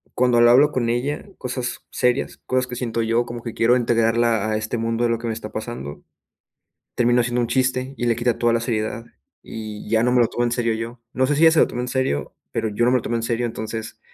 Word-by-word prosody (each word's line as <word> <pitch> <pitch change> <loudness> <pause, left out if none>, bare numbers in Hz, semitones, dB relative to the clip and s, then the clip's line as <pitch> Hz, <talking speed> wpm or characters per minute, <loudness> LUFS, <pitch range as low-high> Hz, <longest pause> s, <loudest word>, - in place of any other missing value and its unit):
cuando 125 -1 +3
lo 120 - +7
hablo 145 +5 +6
con 120 -4 -1
ella 125 +5 -2
cosas 125 0 -4
serias, 125 +2 0
cosas 130 0 0
que 125 - -6
siento 115 -2 -2
yo, 115 +2 +1
como 120 0 -7
que 115 - -5
quiero 120 +2 +3
integrarla 115 -2 +2
a 105 - +1
este 110 +2 -3
mundo 115 +1 -1
de 120 - +2
lo 115 - +1
que 120 - -5
me 115 - -1
está 110 -1 -7
pasando, 110 - -6 0.9
terminó 120 0 +3
haciendo 120 0 0
un 120 - 0
chiste, 130 +1 0
y 120 - -2
le 115 - +2
quita 120 +1 0
toda 120 -1 +2
la 115 - +2
seriedad. 115 0 -2 0.4
Y 110 -1 -7
ya 110 0 +3
no 125 - +2
me 125 - +4
lo 115 - +4
tomo 120 - -2
en 120 - -1
serio 115 -1 0
yo. 115 +2 -5
No 130 - +2
sé 145 - +1
si 155 - 0
ella 160 - +8
se 160 - +3
lo - - +5
toma 125 - -4
en 125 - -3
serio, 130 - -1 0.2
pero 110 - -1
yo 110 +3 0
no 125 - +3
me 130 - +4
lo - - -2
tomo 120 - -2
en 115 - -1
serio. 120 +1 -1
Entonces, 110 0 -6
120 Hz, 260 wpm, -22 LUFS, 115-125 Hz, 0.9 s, ella